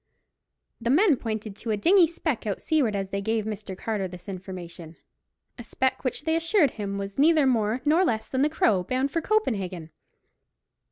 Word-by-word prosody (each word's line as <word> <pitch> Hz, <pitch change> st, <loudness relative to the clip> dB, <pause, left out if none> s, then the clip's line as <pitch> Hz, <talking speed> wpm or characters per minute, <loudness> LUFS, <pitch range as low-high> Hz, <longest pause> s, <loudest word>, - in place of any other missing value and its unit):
The 235 Hz, -, -1 dB
men 325 Hz, -, +5 dB
pointed 215 Hz, -4 st, -5 dB
to 235 Hz, -, -7 dB
a 215 Hz, -, +1 dB
dingy 350 Hz, -, +5 dB
speck 310 Hz, -8 st, -3 dB
out 200 Hz, -, -2 dB
seaward 275 Hz, -10 st, +1 dB
as 195 Hz, -1 st, -3 dB
they 200 Hz, 0 st, -3 dB
gave 220 Hz, +1 st, -1 dB
Mr. 210 Hz, -3 st, -6 dB
Carter 205 Hz, -2 st, -2 dB
this 180 Hz, +2 st, -12 dB
information—a 180 Hz, +3 st, -11 dB
speck 260 Hz, +3 st, -1 dB
which 260 Hz, +2 st, -3 dB
they 320 Hz, +1 st, +1 dB
assured 330 Hz, -, +3 dB
him 200 Hz, -2 st, -4 dB
was 200 Hz, +4 st, -6 dB
neither 310 Hz, 0 st, +5 dB
more 230 Hz, -1 st, +1 dB
nor 320 Hz, +5 st, +4 dB
less 220 Hz, -11 st, -1 dB
than 260 Hz, -, -1 dB
the 295 Hz, -, +3 dB
Crow, 220 Hz, -11 st, +2 dB
bound 260 Hz, +7 st, -1 dB
for 330 Hz, -, -1 dB
Copenhagen. 195 Hz, -, -1 dB
225 Hz, 175 wpm, -26 LUFS, 195-295 Hz, -, men